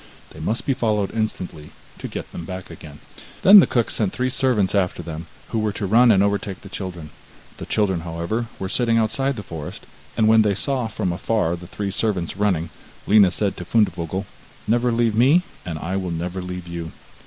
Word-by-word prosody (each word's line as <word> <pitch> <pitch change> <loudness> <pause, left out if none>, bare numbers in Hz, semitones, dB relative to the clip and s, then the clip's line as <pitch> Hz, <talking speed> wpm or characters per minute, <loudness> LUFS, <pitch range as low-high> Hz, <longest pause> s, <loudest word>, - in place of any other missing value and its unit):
They - - -12
must 115 +3 -2
be 135 - +2
followed 110 -6 0
instantly 95 -8 -3 0.3
to - - -5
get - - -7
them 85 - -7
back 95 +1 -7
again.' 75 -2 -11 0.4
Then 200 +2 +10
the - - +5
cook 120 -3 0
sent 105 -4 0
three 130 +1 -1
servants 125 -7 +1
after 90 -3 0
them, 80 0 -7 0.2
who 115 - -1
were 110 -1 0
to 100 - -3
run 115 +5 +5
and 100 -2 +5
overtake 100 -1 -1
the 100 - -11
children. 90 -6 -6 0.5
The - - -8
children, 95 -5 +1
however, 85 +8 -3
were 95 - -4
sitting 115 +3 +2
outside 135 +5 +1
the 105 - -6
forest, 80 -5 -8 0.3
and 110 - +4
when 110 0 +6
they 105 -2 +2
saw 130 +1 0
from 90 -5 -2
afar 95 -2 0
the 85 0 -10
three 100 +1 -4
servants 95 -5 -1
running, 95 -5 0 0.3
Lina 100 -2 +6
said 100 +2 -1
to - - -5
Fundevogel: 95 -2 0 0.4
'Never 120 +2 +2
leave 115 -1 +2
me, 135 +11 +4 0.2
and 80 -3 -3
I 90 +5 -3
will 95 -2 -3
never 90 +2 -3
leave 90 -1 -6
you. 85 -1 -6
100 Hz, 200 wpm, -22 LUFS, 90-115 Hz, 0.5 s, Then